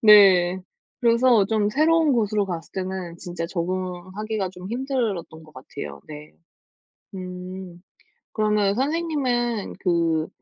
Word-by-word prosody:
네. 190 -4 +7 0.4
그래서 235 -2 +5
좀 210 0 +1
새로운 310 +5 +3
곳으로 210 -3 +1
갔을 170 -3 -6
때는 185 -2 -4
진짜 175 -2 -5
적응하기가 185 +4 -3
좀 180 0 -9
힘들었던 235 - -2
것 155 -1 -17
같아요 75 - -8
네. 150 0 -10 0.8
음 180 -1 -7 0.5
그러면 210 -2 +2
선생님은 260 - -1
그 165 -3 +1
190 Hz, 235 characters per minute, -24 LUFS, 175-230 Hz, 0.8 s, 네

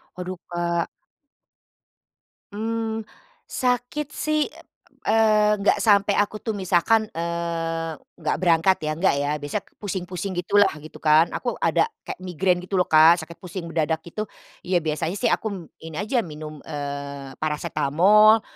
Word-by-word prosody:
Waduh 180 0 -5
Kak. 170 -1 -1 1.6
Mmm, 225 +1 -3 0.4
sakit 250 +4 -1
sih, 305 0 0 0.6
eee, 215 -1 +4
enggak 200 - +3
sampai 205 -2 +3
aku 210 +1 0
tuh. 220 -3 -3
Misalkan, 195 +4 +2
eee, 165 -1 -2 0.2
enggak - - -1
berangkat 175 +1 +4
ya, 155 - -1
enggak 190 +3 +3
ya, 145 - -1
biasanya 145 +7 -4
ke - - -36
pusing-pusing 190 -1 -4
gitulah, 200 +2 +3
gitu 155 - -11
kan. 155 +2 +4
Aku 245 - -3
ada - - +3 0.2
kayak - - -7
migrain 180 0 0
gitu 180 +2 -9
lho 180 -2 +2
Kak, 160 +2 +7
sakit 165 +1 -10
pusing 180 -2 -7
mendadak, 160 -1 0
gitu, 210 +6 -5 0.4
iya 180 -1 +2
biasanya 160 +2 -2
sih 200 - +1
aku - - 0
m - - -5 0.2
ini 160 0 -10
aja 230 +2 0
minum, 155 -1 -8
eee, 140 -2 -6
parasetamol 185 +8 +4
180 Hz, 140 wpm, -24 LUFS, 160-210 Hz, 1.6 s, Kak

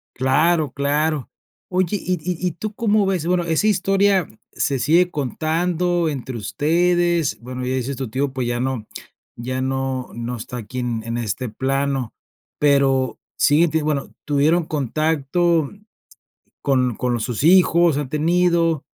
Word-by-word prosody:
Claro, 150 +3 +2
claro. 145 +1 0 0.4
Oye, 185 +2 0
¿y 185 - -2
y 180 +2 -3
y - - -1
tú 210 +6 -6
cómo 215 -2 +2
ves? 185 -4 -1
Bueno, 175 0 +1
esa 165 +5 +1
historia 195 -2 +2 0.2
se 140 - -1
sigue 170 +7 +3
contando 170 +4 0
entre 130 -3 -5
ustedes, 170 - +1
bueno, 125 +1 -6
ya 130 +1 -1
dices, 130 +2 -2
tu 130 -2 -5
tío, 135 +4 -1
pues, 130 -2 -2
ya 120 0 -1
no 125 -3 -2 0.5
ya 130 +2 -3
no 130 -1 -2
no 120 +1 -4
está 120 +2 -7
aquí 120 +2 -6
en 120 -2 -2
en 115 +1 -3
este 120 +2 -3
plano, 135 0 -1 0.5
pero 135 -2 +2 0.2
siguen 155 +4 +4
tenien 155 -1 0
bueno, 145 -3 -2
tuvieron 155 +4 +2
contacto 155 +2 0 0.9
con 125 -4 +1
con 125 -1 -1
sus 120 +3 -3
hijos, 170 -3 +5
han 145 -3 -3
tenido 165 0 +2
145 Hz, 145 wpm, -21 LUFS, 130-175 Hz, 0.9 s, hijos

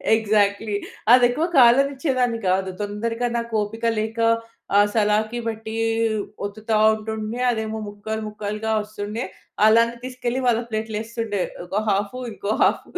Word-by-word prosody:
Exactly. 210 -1 +1 0.4
అది 250 0 +8
ఎక్కువ 305 +7 0
కాలనిచేదాని 255 -1 +3
కాదు. 190 +1 +1
తొందరగా 230 +4 -2
నాకు 235 -1 -4
ఓపిక 225 +3 -4
లేక 220 +1 -3 0.6
ఆ - - +7
సలాకి 215 +2 +1
పెట్టి 220 0 -5 0.7
ఒత్తుతా 215 +2 -3 0.2
ఉంటుండే, 220 +1 -4
అదేమో 220 -1 -3
ముక్కలు 215 +2 -5
ముక్కలుగా 210 +1 -4
వస్తుండే. 210 +1 -5 0.4
అలానే 230 +2 +5
తీసుకెళ్ళి 255 0 -3
వాళ్ళ 235 -2 +3
ప్లేట్‌లో 220 -1 -3
యేస్తుండే. 225 -3 -3 0.2
ఒక 200 +4 -1
హాఫు 205 +5 -1
ఇంకో 200 0 -3
హాఫ్. - - +2
220 Hz, 125 wpm, -23 LUFS, 210-235 Hz, 0.7 s, అది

